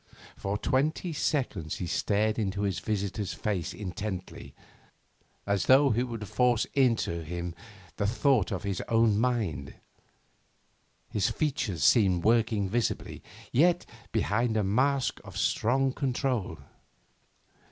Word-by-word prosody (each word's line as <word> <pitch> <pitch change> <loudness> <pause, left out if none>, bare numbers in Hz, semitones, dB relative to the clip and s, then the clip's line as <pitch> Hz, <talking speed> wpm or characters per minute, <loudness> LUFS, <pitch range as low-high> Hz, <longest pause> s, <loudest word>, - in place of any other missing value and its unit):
For 100 +1 -2
twenty 155 - 0
seconds 125 - -1
he 90 - -4
stared 105 +5 0
into 100 -1 -1
his 100 -3 -1
visitor's 100 -1 -3
face 95 -6 -2
intently, 95 -1 -6 0.9
as 100 -1 0
though 135 +1 +6
he 115 +2 +1
would 115 -4 -4
force 125 +2 +2
into 115 -11 +1
him 85 +2 -5 0.4
the 100 - 0
thought 125 -1 +2
in 95 - -2
his 100 -3 -3
own 115 -2 +3
mind. 110 - -1 1.3
His 100 -4 0
features 125 - -1
seemed 95 -7 +4
working 110 -3 +2
visibly, 115 +2 -2 0.3
yet 175 +7 +3 0.3
behind 110 +1 +1
a 105 - +2
mask 130 +5 +1
of - - -10
strong 130 +3 +1
control. 125 - -1
110 Hz, 120 wpm, -28 LUFS, 95-125 Hz, 1.3 s, though